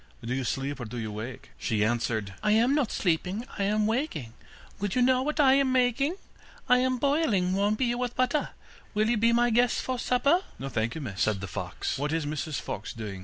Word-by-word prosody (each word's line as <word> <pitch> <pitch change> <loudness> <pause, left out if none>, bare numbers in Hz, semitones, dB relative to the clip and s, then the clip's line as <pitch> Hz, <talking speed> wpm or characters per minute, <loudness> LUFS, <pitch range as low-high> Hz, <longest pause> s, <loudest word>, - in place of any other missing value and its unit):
Do 120 - -2
you 135 +1 -1
sleep 135 +3 -2
or 120 - -4
do 115 +3 -7
you 110 -2 -4
wake?' 115 +4 -7
She 105 -2 +1
answered: 110 -3 -1
'I 210 - +2
am 235 +5 +4
not 285 -6 +1
sleeping, 180 +5 -1
I 200 - +2
am 210 +1 +2
waking, 220 - -2 0.5
Would 200 -1 -2
you 250 - +3
know 255 0 +4
what 300 +3 -2
I 270 -3 +6
am 275 -1 +3
making? 255 +5 +2 0.5
I 250 0 +5
am 255 0 +1
boiling 260 - +2
warm 200 +2 +2
beer 240 +1 0
with 245 -1 -2
butter, 255 +4 +1 0.5
Will 215 +2 +2
you 240 - +2
be 230 +2 +3
my 240 +1 +3
guest 240 +2 +3
for 255 -1 -3
supper?' 280 +9 +3 0.2
'No, 135 - -5
thank 115 -2 -1
you, 160 - -5
miss,' 105 -8 -5
said 110 -3 +2
the 100 - -5
fox, 95 - -4
'what 145 +1 -1
is 160 -1 0
Mrs 150 0 -3
Fox 105 - -5
doing? 105 -4 -6
210 Hz, 220 wpm, -28 LUFS, -, 0.5 s, I